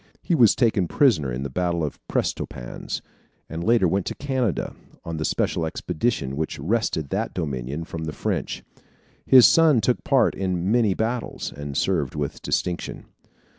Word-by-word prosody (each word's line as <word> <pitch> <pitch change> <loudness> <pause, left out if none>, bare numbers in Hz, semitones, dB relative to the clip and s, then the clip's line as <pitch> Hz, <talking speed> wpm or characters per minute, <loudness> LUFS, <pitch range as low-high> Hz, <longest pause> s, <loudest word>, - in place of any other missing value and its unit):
He - - 0
was 120 -10 +6
taken 110 -7 +2
prisoner 80 - +3
in 60 +2 -3
the 70 - -3
battle 85 +2 0
of 75 - -4
Prestonpans, - - -3 0.4
and 80 +1 -5
later 115 -3 +4
went 95 +2 0
to - - -3
Canada, 130 - -1 0.3
on 85 -1 -4
the 80 - -2
special 85 - 0
expedition 80 - -2
which 80 +2 -3
wrested 80 - -1
that 110 +4 -2
Dominion 70 -2 -3
from 80 -1 -6
the 80 - -3
French. - - -3 0.6
His 130 -2 +9
son 160 -6 +6
took 120 +3 0
part 135 -2 +3
in 95 0 -1
many 110 -5 +3
battles, 115 +2 -3
and 70 0 -5
served 80 -9 0
with 75 -2 -3
distinction. 90 -1 -2
90 Hz, 160 wpm, -24 LUFS, 75-115 Hz, 0.6 s, His